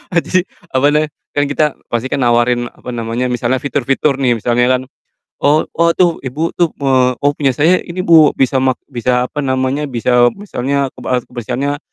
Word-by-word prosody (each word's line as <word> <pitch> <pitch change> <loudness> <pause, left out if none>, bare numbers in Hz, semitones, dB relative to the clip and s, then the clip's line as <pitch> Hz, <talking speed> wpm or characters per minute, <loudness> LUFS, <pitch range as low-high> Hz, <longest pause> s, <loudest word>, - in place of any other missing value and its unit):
adi, 180 +2 +2 0.3
apa 130 +2 +3
namanya, 150 0 +1 0.3
kan 145 - +2
kita 145 +2 +1 0.3
pasti 120 +2 -1
kan 145 - -1
nawarin, 120 0 +2
apa - - -11
namanya, 115 +2 -2
misalnya 125 +1 0
fitur-fitur 140 0 0
nih 125 -3 +2
misalnya 120 +2 +1
kan, - - -7 0.6
“Oh 150 +2 +3
oh, 170 +1 +3
tuh 175 -3 +2
Ibu 150 +6 -3
tuh, 170 -2 +2
eee, 130 -2 +2
oh 145 0 +2
punya 140 -3 +1
saya 165 +7 +3
ini, 185 +1 -5
Bu. 160 -4 +5
Bisa 135 0 +1
mak 130 -1 +1
bisa 125 0 0
apa 145 - -3
namanya, 130 +2 -1
bisa 120 -1 +2
"misalnya, 140 -8 -2
"kebe 125 -1 -2
kebersihannya 125 +4 -3
135 Hz, 175 wpm, -15 LUFS, 125-150 Hz, 0.6 s, Bu